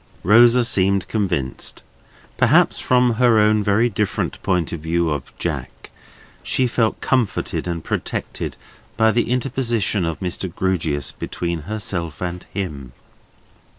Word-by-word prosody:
Rosa 120 +5 +6
seemed 100 -5 +1
convinced. 85 - -3 0.5
Perhaps - - +4
from 125 -2 +2
her 120 -3 +5
own 105 0 +4
very 105 +4 +3
different 105 -2 -2
point 90 -5 0
of 85 - -4
view 80 +1 0
of 75 -3 -4
"Jack," - - -5 0.5
she 130 - +1
felt 115 -2 0
comforted 125 -8 0
and 85 -2 -3
protected - - -4 0.4
by 110 -1 +4
the 120 +1 0
interposition 120 -6 0
of 80 -1 -2
Mr. 90 0 -3
Grewgious 85 -7 -1
between 85 -1 -4
herself 90 -8 -3
and 90 0 -5
him. 70 -10 -5
100 Hz, 125 wpm, -21 LUFS, 85-115 Hz, 0.5 s, Rosa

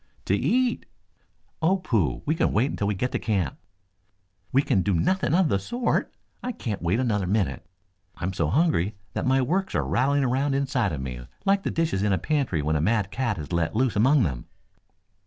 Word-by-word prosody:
"To - - +2
eat." 250 0 +1 0.7
"Oh, 180 +4 +3
pooh! 105 - 0
We 155 - +2
can 160 - +1
wait 125 +7 +1
until 100 - -2
we 105 - 0
get 125 +7 -2
to - - -1
camp." 100 -7 -1 0.9
"We 135 +2 +3
can 95 - +2
do 100 0 +1
nothing 170 - +1
of 185 -2 +4
the 100 - +1
sort! 240 - -1 0.3
I 250 - -3
can't 105 - -4
wait 85 +7 +1
another 105 -7 0
minute. 100 -2 -1 0.5
I'm 95 +2 -3
so - - 0
hungry 135 - +1 0.2
that - - -2
my 130 0 +3
works 190 +9 -1
are - - +1
rattling 140 +3 +2
around 135 +2 +1
inside 130 -6 0
of 75 -4 -4
me 60 -2 -6 0.2
like 195 0 +3
the - - -2
dishes 160 - 0
in 100 -1 +2
a - - +2
pantry 120 - 0
when 80 +1 0
a 75 - +1
mad 100 +2 +1
cat 120 -7 -1
is 75 +2 -6
let 85 +2 0
loose 125 0 +1
among 130 +6 +4
them." 65 - -3
115 Hz, 200 wpm, -25 LUFS, 95-145 Hz, 0.9 s, of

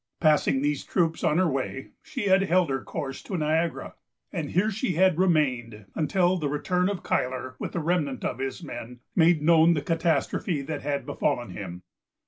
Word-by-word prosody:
Passing 150 -3 +3
these 145 -1 0
troops 165 -3 0
on 160 -2 +2
her 185 0 +3
way, 135 -2 -3
she - - -5
had 190 -1 +4
held 185 -4 +2
her 135 -1 -2
course 135 -4 -5
to 190 - -4
Niagara; 160 +2 -1 0.4
and 160 -6 -3
here 205 +5 +1
she 205 -1 -1
had 180 0 +3
remained 125 - +1
until 180 +3 +2
the 150 -4 -2
return 180 +6 0
of 200 -3 -4
Cuyler, 130 0 -1
with - - -5
the 175 - -1
remnant 150 -5 -1
of 120 - -2
his 135 0 -4
men, 120 +1 -8
made 165 -2 +4
known 165 +1 +5
the 150 - -1
catastrophe 165 -1 0
that 150 +1 -4
had 140 0 -2
befallen - - -1
him. 90 +1 -7
160 Hz, 180 wpm, -26 LUFS, 135-180 Hz, 0.4 s, known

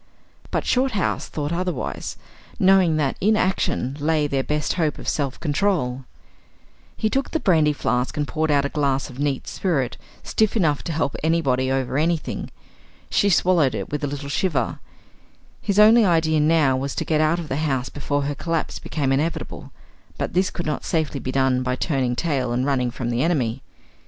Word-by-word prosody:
But - - -1
Shorthouse 250 -7 0
thought 150 +1 -3
otherwise, 180 -6 -3 0.4
knowing 185 -4 +4
that 140 -3 0
in 215 +2 +3
action 185 - 0
lay 155 0 +1
their 140 -2 0
best 150 +2 -1
hope 160 -5 0
of - - -9
self 140 -3 -1
control. 145 -6 0 0.9
He 220 - +1
took 270 +5 -1
the 320 - -1
brandy 160 - +3
flask 125 -2 -1
and 145 -1 0
poured 155 +5 -1
out 140 -1 +3
a - - -1
glass 140 -2 -1
of 130 - -12
neat 140 -2 -1
spirit, 145 -10 -1 0.3
stiff 220 +1 +1
enough 155 -8 +2
to 170 - -2
help 150 -3 -1
anybody 135 -5 +1
over 135 +1 0
anything. 165 0 -1 0.6
She 200 - +3
swallowed 170 - +3
it 100 -2 -5
with 150 0 -3
a - - +1
little 140 0 -5
shiver. 155 0 -1 0.8
His 200 -1 -1
only 220 +2 +7
idea 160 -4 +3
now 150 -3 +3
was 135 +1 -3
to - - -2
get 155 -1 +1
out 155 +2 +2
of 170 -3 -5
the 135 - -2
house 135 -5 -1
before 145 0 -2
her 145 +1 -1
collapse 165 +3 -2
became 140 -4 -2
inevitable; 150 +5 -2 0.5
but - - -3
this 185 +2 +2
could 175 - -5
not 150 - -2
safely 155 -4 -1
be 130 +1 -4
done 130 -1 +2
by 125 0 -1
turning 130 -3 0
tail 135 -4 -1
and 125 +2 0
running 130 -3 +1
from 120 -1 -4
the 120 +1 0
enemy. 130 -7 0
150 Hz, 180 wpm, -23 LUFS, 135-170 Hz, 0.9 s, only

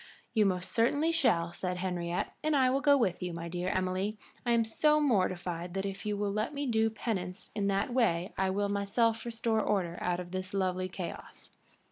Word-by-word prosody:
"You 215 -3 +4
most 185 -1 -1
certainly 285 +8 +2
shall," 175 - +2
said 180 0 -2
Henriette. 180 -1 -2
"And 310 -1 +2
I 260 -2 +4
will 270 +1 +1
go 285 -1 +6
with 195 -9 0
you, 180 -1 -3
my 170 0 -5
dear 175 +1 -3
Emily. 185 +3 -1 0.3
I - - +3
am 230 -1 +3
so 300 +7 +3
mortified 185 - 0
that 195 0 -1
if 195 +2 -5
you 210 -1 0
will 205 0 0
let 215 +8 -1
me 285 0 -2
do 225 -3 +2
penance 205 -3 -4
in 205 -2 0
that 200 +6 0
way 190 -7 +1
I 190 0 +1
will 200 +1 0
myself 220 +3 +1
restore 230 -1 0
order 180 -5 0
out 175 0 0
of 175 -1 -7
this 185 +1 -4
lovely 185 -1 0
chaos." 180 -1 -8
200 Hz, 200 wpm, -31 LUFS, 180-230 Hz, 0.3 s, go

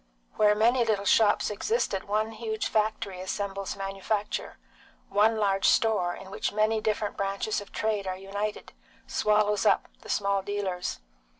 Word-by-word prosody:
Where 210 -1 +4
many 235 +3 +4
little 210 -3 0
shops 210 0 +4
existed 210 - -1
one 215 +2 0
huge 220 -1 -3
factory 210 -3 -1
assembles 195 +1 -3
manufacture; 195 +2 -3 0.5
one 220 +2 +3
large 195 -2 +2
store, 205 -6 +3
in 190 0 -11
which - - -2
many 215 +1 +1
different 215 -1 -1
branches 200 +2 -1
of 205 - -12
trade 210 -3 -1
are 185 0 -2
united, 205 +2 -4 0.3
swallows 210 -1 +2
up - - +3
the - - -13
small 200 -1 +1
dealers. 190 - -3
205 Hz, 140 wpm, -28 LUFS, 195-215 Hz, 0.5 s, Where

